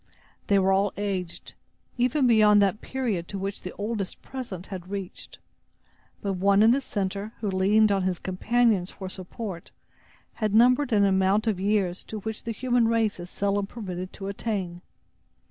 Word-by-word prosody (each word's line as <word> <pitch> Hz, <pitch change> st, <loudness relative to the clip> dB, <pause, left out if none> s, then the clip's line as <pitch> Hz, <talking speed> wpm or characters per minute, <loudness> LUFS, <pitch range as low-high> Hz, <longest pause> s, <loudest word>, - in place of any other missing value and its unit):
They 200 Hz, -, +4 dB
were 190 Hz, 0 st, +3 dB
all 195 Hz, +1 st, +2 dB
aged, 185 Hz, -4 st, -4 dB, 0.4 s
even 255 Hz, +3 st, +2 dB
beyond 215 Hz, -3 st, +6 dB
that 200 Hz, +2 st, +2 dB
period 225 Hz, -10 st, -2 dB
to 200 Hz, -, -5 dB
which 195 Hz, +1 st, -4 dB
the 185 Hz, -, -6 dB
oldest 205 Hz, -2 st, -4 dB
present 220 Hz, -9 st, -6 dB
had 185 Hz, -1 st, -7 dB
reached; 195 Hz, -2 st, -6 dB, 0.9 s
but 200 Hz, -1 st, 0 dB
one 200 Hz, +2 st, +4 dB
in 225 Hz, -, +7 dB
the 270 Hz, +3 st, +2 dB
center, 200 Hz, -2 st, -3 dB
who 205 Hz, -3 st, -2 dB
leaned 205 Hz, +3 st, +4 dB
on 195 Hz, -1 st, +2 dB
his 185 Hz, -1 st, 0 dB
companions 205 Hz, 0 st, +1 dB
for 190 Hz, -1 st, -7 dB
support, 185 Hz, -1 st, -7 dB, 0.7 s
had 215 Hz, -1 st, +1 dB
numbered 250 Hz, +4 st, +5 dB
an 205 Hz, -2 st, +4 dB
amount 195 Hz, +2 st, +2 dB
of 215 Hz, -5 st, 0 dB
years 195 Hz, -2 st, 0 dB
to 220 Hz, -, -6 dB
which 220 Hz, +1 st, -6 dB
the 230 Hz, -, -2 dB
human 245 Hz, 0 st, +1 dB
race 225 Hz, -4 st, +1 dB
is 175 Hz, 0 st, -7 dB
seldom 200 Hz, 0 st, -1 dB
permitted 185 Hz, -5 st, -6 dB
to 195 Hz, -, -7 dB
attain. 195 Hz, -4 st, -3 dB
200 Hz, 165 wpm, -26 LUFS, 190-220 Hz, 0.9 s, in